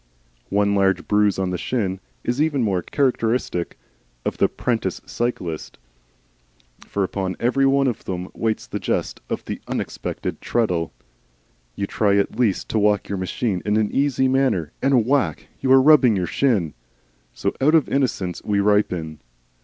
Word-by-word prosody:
One 100 0 +2
large 95 -2 +2
bruise 105 -1 +3
on 95 -1 -1
the 90 - -3
shin 95 -7 -1 0.2
is 125 +4 0
even 150 -5 +1
more 95 -5 +1
characteristic 115 - -1 0.5
of - - -2
the - - +5
'prentice - - -2
cyclist, 90 -10 -3 1.1
for 100 - -1
upon 95 -1 -2
every 135 +3 +2
one 135 0 +3
of 125 -4 -2
them 90 0 -4
waits 110 -1 -1
the - - -5
jest - - -2
of - - -3
the - - -5
unexpected - - -4
treadle. 90 -9 0 0.8
You 100 - -2
try 100 0 +1
at 100 - -1
least 110 -7 +1
to 110 - +1
walk 105 0 +2
your 100 -1 -2
machine 95 +1 -2
in 105 0 +1
an 110 -1 +1
easy 135 -1 +2
manner, 130 - +1
and 130 -4 +3
whack! 140 +2 0
you 130 - 0
are 135 - +8
rubbing 135 -5 +6
your 90 -2 0
shin. 100 - +1 0.6
So - - -1
out 150 +4 +5
of 155 - +4
innocence 110 -10 -1
we 100 -1 +1
ripen. 90 -7 +1
105 Hz, 160 wpm, -22 LUFS, 95-130 Hz, 1.1 s, are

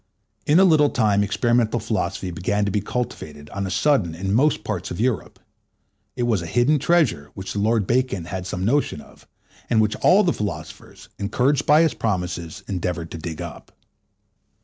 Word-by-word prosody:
In 150 +4 +5
a - - +7
little 155 -5 +5
time 105 -4 +2
experimental 120 +2 +1
philosophy 100 -4 -2
began 100 +4 -1
to 100 - -1
be 105 - 0
cultivated 75 - -5
on 100 -1 -3
a - - -4
sudden 100 - +1
in 95 +3 -2
most 135 -1 +2
parts 100 -2 -4
of 90 - -6
Europe. 120 0 -1 0.8
It 120 - -2
was 115 -6 +1
a 85 - -6
hidden 125 - +2
treasure 150 - +1
which 95 0 -6
the 105 - -2
Lord 110 0 +2
Bacon 120 -7 0
had 90 +1 -5
some 90 0 -3
notion 135 - +1
of, - - -17 0.4
and 115 - +3
which 110 0 +2
all 200 +4 +5
the 175 - +2
philosophers, 105 -4 -7
encouraged 125 +7 +1
by 150 +2 +6
his 160 - +1
promises, 90 -6 -3
endeavoured 90 -3 -3
to 80 - -6
dig 80 -1 -5
up. - - -10
105 Hz, 180 wpm, -22 LUFS, 90-125 Hz, 0.8 s, a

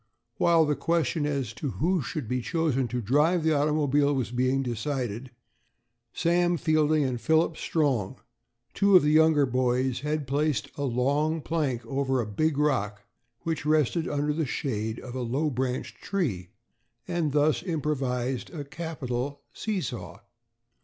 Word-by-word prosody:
While 165 -2 +4
the 150 0 +1
question 160 -2 0
as 135 -6 -2
to 140 - -4
who 175 +2 +1
should 135 +1 -4
be 125 +2 -1
chosen 145 -4 0
to 120 +1 -3
drive 150 - +3
the 160 0 +3
automobile 145 -1 +2
was 125 -4 -2
being 130 +2 +1
decided, 125 -1 -3 0.8
Sam 175 0 +2
Fielding 155 -1 +2
and 125 -3 -2
Philip 160 +1 +2
Strong, 135 - -1 0.5
two 200 -1 +4
of 180 - +8
the 150 - +3
younger 155 -2 +5
boys, 125 0 0
had 150 +1 -2
placed 140 -3 0
a 145 - -2
long 140 +6 +1
plank 145 -6 -2
over 135 -1 0
a 120 - 0
big 140 +9 0
rock 105 -9 0 0.4
which 160 -3 -2
rested 155 +2 +2
under 145 +1 0
the 155 -1 -1
shade 110 -6 -3
of 125 - -9
a 130 - -3
low 135 +6 0
branched 130 0 -3
tree, 120 - -2 0.6
and 170 -4 0
thus 150 +1 +2
improvised 135 -7 -2
a 155 -4 -6
capital 140 -3 -4
see 210 -4 -2
saw. 100 - -6
145 Hz, 150 wpm, -27 LUFS, 125-155 Hz, 0.8 s, of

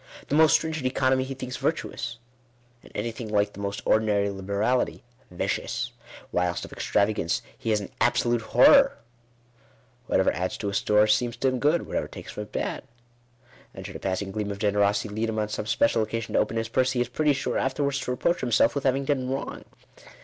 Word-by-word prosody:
The 145 - +1
most 155 0 +6
strin 160 0 +2
gent 145 -5 -1
economy 130 0 +2
he 135 +1 -6
thinks 125 -1 -5
virtuous; 120 -7 -2 0.6
and - - -17
anything 115 0 -4
like 105 -1 +1
the - - -11
most 100 0 -4
ordinary 105 -2 +2
liberality 100 +6 -1 0.3
vicious; 90 - -2 0.4
whilst 90 0 0
of - - -12
extravagance 100 -5 0
he - - -5
has 105 -1 +2
an 100 - -8
absolute 120 -1 +2
horror. 275 - +6 1.1
Whatever - - +3
adds 90 +4 -2
to 100 - -3
his 100 - 0
store 105 0 +4
seems 120 +3 +1
to 130 +2 +2
him 130 -1 -2
good; 150 +5 +2
whatever - - -2
takes - - -9
from - - -6
it, - - -23
bad. - - -3 0.9
And - - -8
should - - -8
a - - -5
pass 95 +1 -1
ing 95 - -7
gleam 105 0 -3
of 100 - -4
generosity 100 0 +1
lead 110 +2 -1
him 110 - -3
on 105 -1 -1
some 105 - -4
special 115 +1 +2
occasion 110 +1 -3
to - - +4
open 115 - 0
his 115 0 -1
purse, 130 +3 +1
he 125 - 0
is 120 - 0
pretty 150 +4 +1
sure 135 - -1
afterwards 140 +1 0
to 130 - -5
reproach 170 +8 0
himself 120 -2 +3
with 140 -1 -3
having 135 +1 +2
done 130 -3 0
wrong. 135 +1 -4
115 Hz, 200 wpm, -26 LUFS, 105-130 Hz, 1.1 s, most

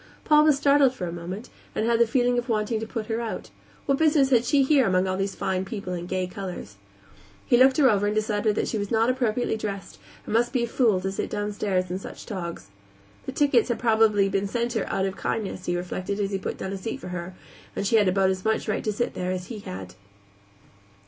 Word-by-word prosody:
Paul 300 0 +5
was 300 -3 +5
startled 280 -2 +4
for 185 - -4
a 170 - -4
moment, 175 +6 -7 0.2
and 215 - 0
had 230 0 +2
the 235 - +5
feeling 245 +1 +2
of 240 +1 -6
wanting 220 0 0
to 220 - -5
put 225 -1 -4
her 225 +1 -2
out; 230 - -5 0.3
what 275 -1 +1
business 295 -4 +4
had 240 -1 +4
she 275 +3 +4
here 270 -2 +4
among 185 0 +2
all 185 0 -1
these 195 0 -2
fine 185 0 -1
people 195 -2 -5
and 175 0 -5
gay 185 -1 0
colors? 180 - -7 0.7
He - - +4
looked 260 +2 +5
her 285 -3 +6
over 205 -3 +3
and 210 - -1
decided 215 0 +1
that - - 0
she 220 - -2
was 205 -1 -3
not 225 +2 +3
appropriately 245 -2 0
dressed 195 - -6 0.3
and - - -5
must 240 +3 +2
be 250 -3 +1
a - - -1
fool 225 -5 +2
to 190 +1 -2
sit 195 - -3
downstairs 205 -3 -1
in 185 - -2
such - - -9
togs. 170 - -6 0.6
The - - -2
tickets 275 -5 +3
had 240 - 0
probably 220 -3 +3
been 195 0 0
sent 235 +3 -2
her 225 - -2
out 190 - 0
of 195 0 -4
kindness, 195 -4 -3
he 175 - 0
reflected 185 +3 -4
as 200 -1 -1
he 195 - -1
put - - -4
down 190 - -4
a - - -3
seat 210 +4 -5
for 180 - -8
her, 180 +1 -6 0.4
and 200 - -2
she 225 +3 +4
had 205 -3 +4
about 190 +1 +3
as 185 -1 -4
much 220 0 0
right - - -1
to 215 - 0
sit 225 +4 -2
there 180 0 -3
as 180 -1 -4
he 225 -4 -6
had. 95 - -8
210 Hz, 240 wpm, -25 LUFS, 190-240 Hz, 0.7 s, her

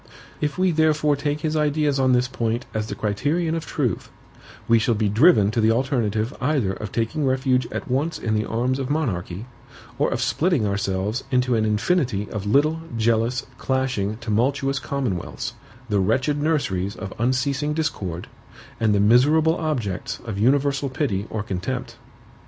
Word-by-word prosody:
If 150 -2 -1
we 185 0 +3
therefore 155 -2 +3
take 145 +1 -2
his 155 -1 -1
ideas 150 -2 +1
on 130 -1 +3
this 125 0 +3
point 115 -2 -2
as 110 0 -2
the - - -5
criterion 150 - 0
of 165 -2 -3
truth, 125 - -2 0.6
we 115 0 +5
shall 115 +1 +1
be 105 0 +1
driven 105 - +5
to 115 0 0
the 110 - +4
alternative 115 -2 0
either 130 -8 +1
of 105 +1 -6
taking 120 +7 -1
refuge 130 -1 +1
at - - -4
once 140 +6 0
in 110 - -2
the 105 0 +1
arms 125 +4 0
of 130 - -3
monarchy, 105 - -2 0.5
or - - +3
of - - -2
splitting 165 - +1
ourselves 100 +3 -1
into 125 -1 +2
an 110 -1 +2
infinity 110 - +1
of 105 -2 -4
little, 150 +8 +3 0.2
jealous, 115 +2 +1
clashing, 130 -6 -1
tumultuous 130 +5 0
commonwealths, 125 -13 -3 0.3
the 105 -3 +1
wretched 130 +9 +1
nurseries 100 - 0
of 95 -3 -7
unceasing 140 +5 0
discord, 95 - -3 0.5
and 110 -2 +3
the - - +2
miserable 145 +10 +4
objects 125 - -2
of 105 -4 -4
universal 140 +3 +2
pity 120 -7 -1
or 110 -1 -3
contempt. 120 +5 -4
125 Hz, 160 wpm, -23 LUFS, 110-145 Hz, 0.6 s, we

